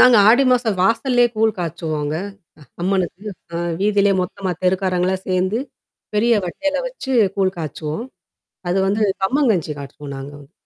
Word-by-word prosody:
நாங்க 250 -1 +8
ஆடி 245 +5 +6
மாசம் 240 -5 +2
வாசல்லயே 245 +4 +3
கூழ் 220 +1 +3
காய்ச்சுவோங்க 155 -3 -3 0.7
அம்மனுக்கு. 185 +1 -1 0.3
அ - - -1 0.2
வீதியிலே 200 0 +3
மொத்தமா 185 +1 -3
தெருக்காரங்களலாம் 185 0 +1
சேர்ந்து, 185 +4 +1 0.6
பெரிய 230 +3 +3
வட்டையில 290 - -2
வச்சு - - -5 0.2
கூழ் 190 -1 +2
காய்ச்சுவோம். 155 - -4 0.6
அது 180 - +1
வந்து 210 +2 +1 0.2
கம்மங்கஞ்சி 205 - +2
காச்சுவோம், 140 0 -8
நாங்க 135 +1 -7
வந்து. 140 -1 -16
190 Hz, 130 wpm, -20 LUFS, 175-225 Hz, 0.7 s, நாங்க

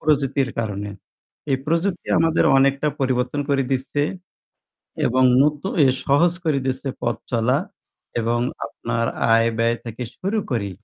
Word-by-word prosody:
প্রযুক্তির 140 -3 +1
কারণে। 105 -2 -3 0.6
এই 135 - +3
প্রযুক্তি 170 +3 0
আমাদের 165 0 +3
অনেকটা 140 +2 +2
পরিবর্তন 130 +2 0
করে 140 -1 +2
দিচ্ছে 135 +2 -1 1.0
এবং 130 +2 +3 0.2
নতুন 150 +5 -1
এ - - +6 0.2
সহজ 155 +5 +4
করে 145 -3 +2
দিচ্ছে 130 +1 -2
পথ 120 -1 -1
চলা 115 +1 +2 0.6
এবং 115 +1 0 0.3
আপনার 115 0 -3 0.3
আয়-ব্যয় 115 0 +2
থেকে 115 +2 -5
শুরু 195 +4 -2
করে 105 -5 -1
130 Hz, 125 wpm, -22 LUFS, 115-145 Hz, 1.0 s, এ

